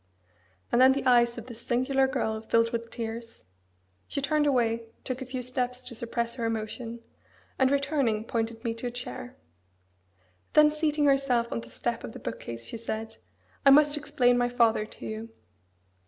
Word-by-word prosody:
And 240 - +4
then 260 +1 +8
the 275 - -3
eyes 240 -1 +4
of 235 - -7
this 235 -2 -10
singular 265 +3 +2
girl 220 -4 -1
filled 230 +1 +2
with 230 0 -3
tears. 230 0 -6 0.6
She - - -3
turned 295 +2 +2
away, 230 -4 +1 0.2
took 255 0 -4
a 260 - -5
few 255 -1 -4
steps 250 0 -2
to 250 - -8
suppress 235 0 -3
her 235 -3 -3
emotion, 225 +1 -4 0.6
and 265 -1 +5
returning, 280 -6 +1
pointed 225 0 -3
me 230 -2 -1
to 230 +2 -5
a - - -1
chair. 125 - -7 1.2
Then 300 0 +7
seating 300 -1 +1
herself 270 -4 +2
on 115 - -2
the 115 - -12
step - - -3
of - - -7
the - - -8
book - - -5
case, 115 0 -7
she 230 - -6
said, 225 0 -5 0.5
"I 275 - +7
must 295 +1 +6
explain 275 -5 +2
my 245 0 +2
father 230 -3 +2
to - - -11
you." 220 +1 -5
240 Hz, 180 wpm, -28 LUFS, 225-265 Hz, 1.2 s, then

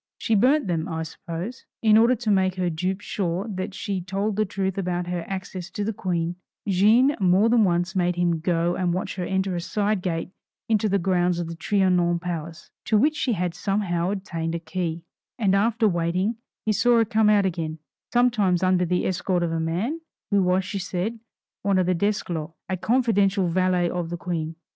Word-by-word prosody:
She 225 - -1
burnt 260 +8 +4
them, 170 -2 -1
I 160 -2 -3
suppose. 170 +8 -7 0.2
In 215 -1 +6
order 230 +3 +5
to 225 -2 -1
make 190 -2 +2
her 180 -2 -1
dupe 185 +5 -2
sure 190 0 -2
that 185 -1 -4
she 195 -2 -3
told 195 +3 -2
the 215 +1 +1
truth 190 0 -2
about 180 -1 -1
her 175 -1 -3
access 185 -1 -5
to 205 - -4
the 220 +2 -1
Queen, 175 -3 -2 0.3
Jeanne 220 +9 +4
more 190 +3 +4
than 230 -1 +5
once 175 0 +1
made 180 -1 +1
him 175 -2 +1
go 170 +1 +1
and 180 -2 0
watch 185 - -3
her 180 - -2
enter 190 0 -1
a 175 - -2
side 205 +2 0
gate 170 -1 -3 0.4
into 215 -1 +2
the 200 - +2
grounds 180 -1 +1
of 175 - -2
the 165 - -6
Trianon 180 -2 +2
palace, 170 -2 -6
to 220 - +3
which 300 +8 +3
she 255 -5 0
had 180 -3 -1
somehow 190 -4 -1
obtained 170 -5 -3
a - - -2
key; 165 0 -4 0.3
and 205 -6 +2
after 225 +3 +3
waiting 180 +4 0 0.3
he 215 - +2
saw 240 +3 +4
her 225 - +4
come 220 -1 +3
out 205 -2 +4
again, 165 -4 -2 0.3
sometimes 215 -7 +2
under 185 -1 +3
the 180 +1 0
escort 185 -1 0
of 170 - -1
a 165 - -1
man, 185 - -2 0.3
who 200 -1 +4
was, 185 0 +2
she 200 - -4
said 185 +5 -3 0.4
one 200 0 +1
Desclos, 180 -3 0
a 190 - -1
confidential 200 -3 +2
valet 180 0 +2
of 170 -1 -3
the 175 - -4
Queen. 165 -2 -3
185 Hz, 195 wpm, -24 LUFS, 175-205 Hz, 0.4 s, In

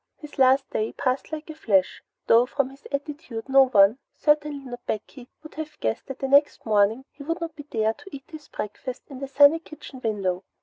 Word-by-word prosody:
His 300 -3 -12
last 265 +1 +5
day 215 +1 -1
passed 255 +3 -2
like 310 0 -5
a - - -8
flash, 200 -11 +1 0.2
though 235 +2 +5
from 275 -1 -1
his 275 +1 -14
attitude 280 -5 -5
no 270 0 +6
one, 210 0 +5 0.2
certainly 295 -2 +1
not 245 -1 -8
Becky, 240 +4 -5
would 310 - -11
have 310 0 -7
guessed 110 0 -2
that 270 - -6
the 270 - -3
next 285 +2 +3
morning 215 +4 +2
he - - -15
would 330 +5 -3
not 330 -2 -5
be 290 -1 -10
there 220 -1 +1
to 390 - -14
eat 275 -2 -9
his 310 -2 -10
breakfast 245 +5 -6
in 270 -3 -9
the 275 - -4
sunny 285 +4 +6
kitchen 300 -5 -12
window. 195 -5 -1
270 Hz, 210 wpm, -25 LUFS, 225-295 Hz, 0.2 s, no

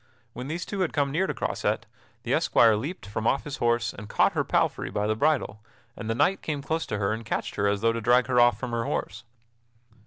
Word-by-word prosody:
When 125 +2 -6
these 170 +4 -4
two 200 - -5
had 185 -3 0
come 140 -2 +1
near 185 +7 +1
to - - -2
Croisette, - - -1 0.4
the - - -1
esquire 115 -2 +4
leaped 135 - -5
from 110 +3 -3
off 135 - +1
his 150 0 -6
horse 120 -2 +1
and 100 +1 -10
caught - - +3
her - - 0
palfrey - - 0
by 105 - -1
the 110 - +1
bridle, 120 -6 0 0.3
and 110 - -6
the 115 - 0
knight 190 +10 +2
came 145 -3 -3
close 160 +3 -2
to 105 - -2
her 100 +1 0
and 110 +1 -5
catched 115 - -3
her 100 0 0
as 100 0 0
though 115 0 +3
to 115 - -3
drag 120 +2 +4
her 125 -2 +2
off 120 0 +5
from 120 - -4
her 115 -1 -1
horse. 100 - -3
120 Hz, 245 wpm, -26 LUFS, 110-145 Hz, 0.4 s, off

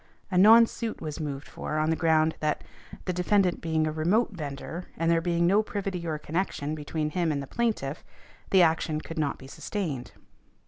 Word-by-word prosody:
A 180 - +1
non 225 +4 +9
suit 230 0 -5
was 155 0 -5
moved 145 -2 -4
for 155 - -4
on 155 +1 +2
the - - +2
ground, 160 -1 +3
that 155 -1 -1 0.4
defendant 180 +1 +1
being 160 -1 +1
a 155 - -1
remote 180 +10 +1
vendor 160 +1 -6
and 165 +1 +2
there 165 0 +3
being 170 0 +1
no 200 +5 +4
privity 195 -5 -4
or 155 -1 -1
connection 155 -2 -2
between 150 0 -3
him 170 -1 0
and 145 - -1
the 140 - -4
plaintiff, 190 - -2 0.5
the 190 -2 +6
action 160 -1 +1
could 165 0 -6
not 145 -2 0
be - - -13
sustained. 140 - -4
165 Hz, 185 wpm, -27 LUFS, 155-185 Hz, 0.5 s, non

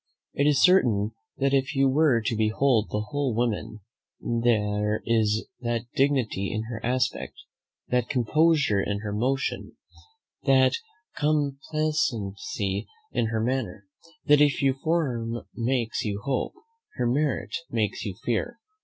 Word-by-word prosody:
It 140 - +2
is 140 -3 +3
certain 115 - +4 0.3
that 135 0 +1
if 135 +1 +1
you 135 0 +4
were 135 -3 +3
to 115 - 0
behold 110 +1 +2
the 105 - -1
whole 145 -5 0
woman, 110 -2 -2 0.4
there 105 -3 0
is 110 -2 +1
that 120 -1 -2
dignity 130 -8 +1
in 110 0 -2
her 115 -2 -6
aspect, 125 +1 -1 0.5
that 125 -2 +1
composure 145 -3 +3
in 100 +1 -2
her 105 -1 -4
motion, 130 +6 -2 0.7
that 130 -1 +5 0.4
complacency 135 -10 -1 0.2
in 115 - 0
her 110 0 -1
manner, 115 -6 -2 0.4
that 150 -1 +5
if 145 -2 +4
her 135 -1 +4
form 130 -6 -1
makes 120 -1 -1
you 100 -2 -2
hope, 135 -2 -1 0.4
her 125 - -1
merit 140 +4 0
makes 110 -3 -1
you 100 -3 -4
fear. 235 - -1
120 Hz, 130 wpm, -26 LUFS, 110-140 Hz, 0.7 s, that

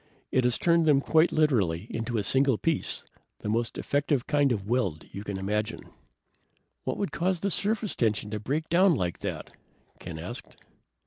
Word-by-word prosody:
It 130 -1 +2
has 125 -1 +3
turned 170 -1 +3
them 145 -3 +6
quite 160 +4 +3
literally 105 - +2
into 115 +1 -2
a 105 - 0
single 135 +2 +3
piece, 165 +3 -1 0.4
the 105 - -3
most 115 +1 -1
effective 145 -2 0
kind 145 -2 +2
of 100 -5 -1
weld 100 -10 0
you 100 - -6
can 100 -2 -4
imagine." 105 +3 -3 0.9
"What - - -2
would 200 - -2
cause 180 0 0
the 200 - 0
surface 215 +1 0
tension 105 -2 0
to 105 - -2
break 145 +9 -2
down 180 +1 +4
like 90 -8 -2
that?" - - -5 0.5
Ken 85 -2 -7
asked. 90 +9 -8
125 Hz, 175 wpm, -28 LUFS, 105-155 Hz, 0.9 s, them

